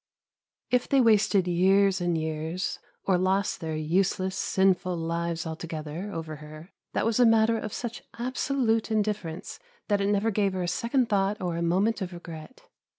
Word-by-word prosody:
If 250 Hz, 0 st, +2 dB
they 275 Hz, -, +4 dB
wasted 210 Hz, -5 st, +4 dB
years 190 Hz, +2 st, +3 dB
and 175 Hz, -1 st, +1 dB
years, 160 Hz, +3 st, -3 dB, 0.3 s
or 185 Hz, -2 st, +3 dB
lost 190 Hz, +2 st, +1 dB
their 160 Hz, -2 st, -3 dB
useless, 185 Hz, +4 st, 0 dB
sinful 190 Hz, -2 st, +1 dB
lives 170 Hz, 0 st, -2 dB
altogether, 160 Hz, +3 st, -5 dB
over 160 Hz, -3 st, -5 dB
her, 155 Hz, +4 st, -11 dB, 0.2 s
that -, -, 0 dB
was 225 Hz, +1 st, +1 dB
a -, -, +7 dB
matter 225 Hz, 0 st, +4 dB
of 215 Hz, -, -5 dB
such 235 Hz, +1 st, -5 dB, 0.2 s
absolute 240 Hz, -2 st, 0 dB
indifference 210 Hz, -6 st, -2 dB, 0.3 s
that 205 Hz, -1 st, +2 dB
it 200 Hz, -, +1 dB
never 205 Hz, +2 st, +2 dB
gave 200 Hz, -2 st, +1 dB
her 185 Hz, -1 st, -2 dB
a -, -, -2 dB
second 235 Hz, +7 st, +1 dB
thought 205 Hz, -1 st, +1 dB
or 175 Hz, -2 st, -2 dB
a 170 Hz, -, -2 dB
moment 195 Hz, +6 st, +1 dB
of 185 Hz, -1 st, -4 dB
regret. 170 Hz, +5 st, -10 dB
190 Hz, 165 wpm, -27 LUFS, 170-215 Hz, 0.3 s, a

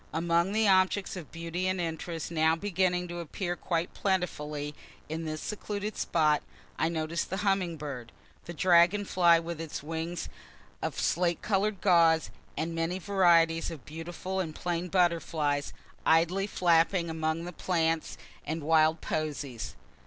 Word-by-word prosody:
Among 170 Hz, +3 st, +1 dB
the 215 Hz, +1 st, +2 dB
objects 190 Hz, +1 st, +3 dB
of 175 Hz, -5 st, -8 dB
beauty 170 Hz, +2 st, -3 dB
and 185 Hz, 0 st, 0 dB
interest 165 Hz, -1 st, -4 dB
now 160 Hz, 0 st, +3 dB
beginning 180 Hz, -1 st, 0 dB
to 175 Hz, 0 st, -5 dB
appear 175 Hz, +2 st, -3 dB
quite 170 Hz, 0 st, -2 dB
plentifully 150 Hz, -6 st, -2 dB, 0.3 s
in 160 Hz, +1 st, -4 dB
this 155 Hz, -1 st, -4 dB
secluded 210 Hz, 0 st, -4 dB
spot, 155 Hz, -3 st, +2 dB, 0.4 s
I 160 Hz, -, +2 dB
notice 165 Hz, 0 st, -1 dB
the 190 Hz, -, -4 dB
humming 185 Hz, -4 st, +1 dB
bird, 135 Hz, -6 st, -6 dB, 0.3 s
the 170 Hz, -, -6 dB
dragon 180 Hz, +4 st, +4 dB
fly 175 Hz, -3 st, +5 dB
with 165 Hz, -1 st, -5 dB
its 160 Hz, -3 st, -6 dB
wings 165 Hz, +2 st, -4 dB, 0.5 s
of -, -, -3 dB
slate 175 Hz, 0 st, +1 dB
color'd 205 Hz, -1 st, 0 dB
guaze, 165 Hz, -4 st, +4 dB, 0.3 s
and 165 Hz, +1 st, -2 dB
many 165 Hz, +2 st, -1 dB
varieties 170 Hz, -4 st, +3 dB
of 160 Hz, -6 st, -9 dB
beautiful 175 Hz, +4 st, -5 dB
and 160 Hz, -4 st, -3 dB
plain 175 Hz, 0 st, -2 dB
butterflies, 165 Hz, -5 st, +1 dB, 0.3 s
idly 175 Hz, +5 st, +3 dB
flapping 170 Hz, -1 st, +3 dB
among 160 Hz, +1 st, -2 dB
the 175 Hz, -, -6 dB
plants 165 Hz, -2 st, 0 dB, 0.3 s
and 160 Hz, 0 st, -4 dB
wild 160 Hz, +1 st, +3 dB
posies. 145 Hz, -6 st, -3 dB
170 Hz, 145 wpm, -29 LUFS, 160-180 Hz, 0.5 s, fly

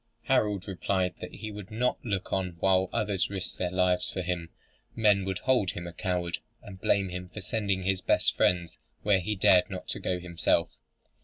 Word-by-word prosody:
Harold 105 Hz, -3 st, +1 dB
replied 95 Hz, -1 st, 0 dB
that -, -, -7 dB
he 110 Hz, 0 st, -6 dB
would 105 Hz, -2 st, -8 dB
not 120 Hz, +3 st, 0 dB
look 100 Hz, -4 st, -2 dB
on 90 Hz, -2 st, -1 dB
while 95 Hz, 0 st, +3 dB
others 105 Hz, -5 st, 0 dB
risked 95 Hz, -2 st, -5 dB
their 90 Hz, -, 0 dB
lives 90 Hz, 0 st, +2 dB
for 95 Hz, -, -3 dB
him. 85 Hz, -2 st, -2 dB, 0.5 s
Men 105 Hz, -4 st, +4 dB
would 95 Hz, -1 st, -1 dB
hold 125 Hz, -2 st, +2 dB
him 85 Hz, 0 st, -5 dB
a 85 Hz, -, -7 dB
coward, 90 Hz, -1 st, -2 dB, 0.2 s
and 95 Hz, -2 st, -11 dB
blame 100 Hz, -2 st, +2 dB
him 90 Hz, 0 st, -6 dB
for 105 Hz, -, -8 dB
sending 100 Hz, -2 st, -1 dB
his 95 Hz, 0 st, +1 dB
best -, -, +2 dB
friends 85 Hz, -3 st, +1 dB, 0.2 s
where 100 Hz, -2 st, +4 dB
he 105 Hz, +4 st, -2 dB
dared 95 Hz, -1 st, +5 dB
not -, -, -4 dB
go 90 Hz, -1 st, -1 dB
himself. 85 Hz, -2 st, +1 dB
95 Hz, 185 wpm, -29 LUFS, 90-100 Hz, 0.5 s, dared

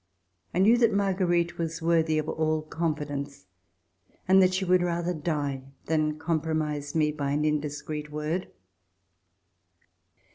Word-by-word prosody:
I -, -, -4 dB
knew 215 Hz, +6 st, +5 dB
that 230 Hz, -2 st, +4 dB
Marguerite 180 Hz, -4 st, +1 dB
was 165 Hz, -1 st, -2 dB
worthy 160 Hz, -1 st, +2 dB
of 155 Hz, 0 st, -1 dB
all 155 Hz, -1 st, 0 dB
con 160 Hz, 0 st, -1 dB
fidence 140 Hz, -1 st, -6 dB, 0.8 s
and 190 Hz, +1 st, +6 dB
that 185 Hz, 0 st, +4 dB
she 190 Hz, 0 st, -1 dB
would 180 Hz, 0 st, +4 dB
rather 175 Hz, 0 st, -1 dB
die 145 Hz, -4 st, -2 dB, 0.2 s
than 155 Hz, -1 st, 0 dB
com 160 Hz, 0 st, -1 dB
promise 150 Hz, -2 st, -2 dB
me 155 Hz, -1 st, +3 dB
by 145 Hz, -2 st, -3 dB
an 150 Hz, +2 st, 0 dB
indiscreet 150 Hz, 0 st, -3 dB
word. 155 Hz, +5 st, -2 dB
160 Hz, 140 wpm, -27 LUFS, 150-175 Hz, 0.8 s, and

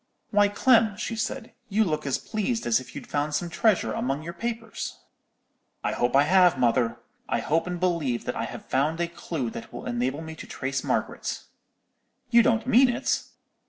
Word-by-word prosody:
"'Why, 205 Hz, 0 st, +5 dB
Clem,' 220 Hz, -1 st, +3 dB
she 230 Hz, -, -3 dB
said, 230 Hz, +2 st, -4 dB, 0.2 s
'you 215 Hz, +2 st, +3 dB
look 155 Hz, -6 st, -2 dB
as 135 Hz, -, +1 dB
pleased 225 Hz, +2 st, -2 dB
as 115 Hz, 0 st, +3 dB
if 130 Hz, -, -12 dB
you'd -, -, -6 dB
found 145 Hz, +1 st, -1 dB
some 170 Hz, +3 st, -2 dB
treasure 180 Hz, -, +2 dB
among 135 Hz, +4 st, -2 dB
your 170 Hz, +1 st, -6 dB
papers.' 225 Hz, +2 st, -4 dB, 0.9 s
"'I -, -, 0 dB
hope 120 Hz, +2 st, 0 dB
I 140 Hz, -, +7 dB
have, 180 Hz, 0 st, +5 dB
mother. 120 Hz, -1 st, +2 dB, 0.3 s
I -, -, +1 dB
hope 160 Hz, +9 st, 0 dB
and 180 Hz, -1 st, -3 dB
believe 165 Hz, -9 st, 0 dB
that -, -, -2 dB
I -, -, -2 dB
have -, -, -8 dB
found 150 Hz, +5 st, 0 dB
a 170 Hz, -, +1 dB
clue 155 Hz, -7 st, -4 dB
that 115 Hz, -, -8 dB
will 120 Hz, -, -8 dB
enable 130 Hz, +6 st, -1 dB
me 160 Hz, 0 st, -7 dB
to -, -, -9 dB
trace 135 Hz, 0 st, -3 dB
Margaret.' -, -, -2 dB, 0.9 s
"'You 235 Hz, -1 st, +8 dB
don't 230 Hz, -1 st, +2 dB
mean 255 Hz, +1 st, +6 dB
it?' 240 Hz, -, 0 dB
170 Hz, 190 wpm, -26 LUFS, 135-215 Hz, 0.9 s, You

